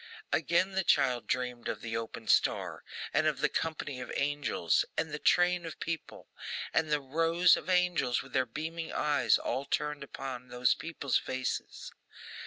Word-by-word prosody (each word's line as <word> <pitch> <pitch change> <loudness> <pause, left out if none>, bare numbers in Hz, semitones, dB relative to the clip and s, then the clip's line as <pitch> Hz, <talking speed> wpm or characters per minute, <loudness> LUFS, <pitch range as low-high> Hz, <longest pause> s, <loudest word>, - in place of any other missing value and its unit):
Again 180 +3 +2
the 190 0 0
child 125 - +2
dreamed 125 -1 -2
of - - -3
the 115 -1 -4
open 115 0 -5
star, - - +2 0.3
and 155 +2 +3
of 150 -3 +1
the - - +1
company 145 -5 -3
of - - -6
angels, 145 - +1
and 160 - -1
the 150 - -4
train 175 +2 +3
of 165 -1 -7
people, 165 -2 -5 0.5
and 160 -1 +1
the 150 - +3
rows 165 +5 +4
of - - -6
angels 180 -9 +2
with 135 -1 -15
their 130 -1 +2
beaming 160 +6 -5
eyes 140 -7 +3
all 135 - -2
turned 150 0 -2
upon 130 -2 -6
those 125 0 +2
people's 160 -5 -1
faces. 130 -1 -4
145 Hz, 165 wpm, -31 LUFS, 125-165 Hz, 0.5 s, rows